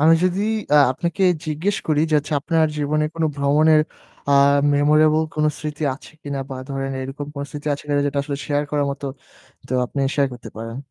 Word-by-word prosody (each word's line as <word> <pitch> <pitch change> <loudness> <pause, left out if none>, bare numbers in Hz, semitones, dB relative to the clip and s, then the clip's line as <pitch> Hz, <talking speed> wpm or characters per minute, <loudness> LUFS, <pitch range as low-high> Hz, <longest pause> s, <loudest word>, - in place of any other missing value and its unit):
আমি 160 +2 +6
যদি 185 +2 +1 0.3
অ্যা 150 - +6
আপনাকে 170 +6 -2 0.2
জিজ্ঞেস 165 +7 -1
করি 150 -1 +3
যে 155 - +3
হচ্ছে 145 +1 -5
আপনার 160 +1 +2
জীবনে 150 +1 +1
কোনো 165 -1 +1
ভ্রমণের 150 +2 +4 0.5
আ - - +5 0.4
memorable 155 +2 +4
কোনো 155 0 +2
স্মৃতি 150 0 -5
আছে 140 - -14
কিনা 140 -1 -4
বা 130 - -4
ধরেন 135 0 -3
এরকম 135 +2 -6
কোনো 140 - -4
স্মৃতি 145 0 -8
আছে 145 - -4
কিনা 145 -1 +1
যেটা 140 0 -1
আসলে 140 0 -4
share 145 -1 0
করার 145 -1 +1
মতো, 140 0 -5 0.6
তো 130 - -4
আপনি 140 - -5 0.2
share 140 -2 +2
করতে 120 - -10
পারেন? 115 +1 -6
145 Hz, 195 wpm, -21 LUFS, 140-155 Hz, 0.6 s, আমি